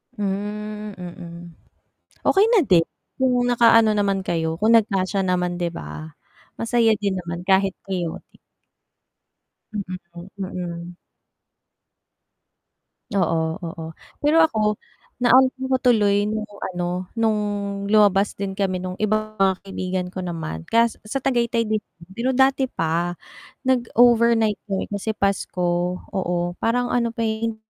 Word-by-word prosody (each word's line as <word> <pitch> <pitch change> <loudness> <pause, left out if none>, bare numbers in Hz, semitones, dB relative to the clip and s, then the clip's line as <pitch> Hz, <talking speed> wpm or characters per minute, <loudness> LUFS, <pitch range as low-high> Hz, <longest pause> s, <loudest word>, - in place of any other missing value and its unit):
Hmm, 210 +1 -4
mm. 175 -1 -9 0.8
Okey 395 +1 +5
na 445 - +6
din, 170 -3 +5 0.3
kung 250 -2 +2
naka-ano 230 -2 +5
naman 200 -1 +1
kayo 160 -1 -1
kung 225 +2 +5
nag-kasya 195 -3 +1
naman 180 -1 0
di 175 - +1
ba? 75 +1 -8 0.5
Masaya 230 -1 +3
din 200 -2 0
naman 170 0 -5
kahit 195 0 +4 0.2
chaotic. 175 -4 -4 1.4
Hmm, 210 - -2 0.6
mm. 175 -2 -6 2.2
Oo, 170 -4 +2 0.3
oo. 165 -1 -6 0.4
Pero 315 +3 +4
ako, 215 -8 +1 0.5
naalalaa 260 +2 +4
ko 260 - +4
tuloy 210 -5 +3
nung 215 0 -2 0.3
ano, 180 +1 -2
nung 220 -2 +2 0.5
lumabas 205 -1 +4
din 200 -1 -3
kami 190 -2 -2
nung 185 0 -5
iba 215 0 0
mga 190 -1 +4
kaibigan 185 -1 -3
ko 190 - -6
naman 165 - -5
kas 230 0 +2
sa 270 +4 -3
Tagaytay 235 -3 +1
din. 215 0 0 0.3
Pero 245 +6 -1
dati 265 0 +3
pa, 170 -2 -1 0.5
nag-overnight 235 -3 +3
kami 195 0 -3
kasi 210 +2 -2
Pasko 180 -2 0 0.2
oo 185 -3 -1 0.2
parang 245 +2 0
ano 235 -1 +1
pa 230 - -1
yung 220 0 -1
205 Hz, 120 wpm, -22 LUFS, 180-230 Hz, 2.2 s, na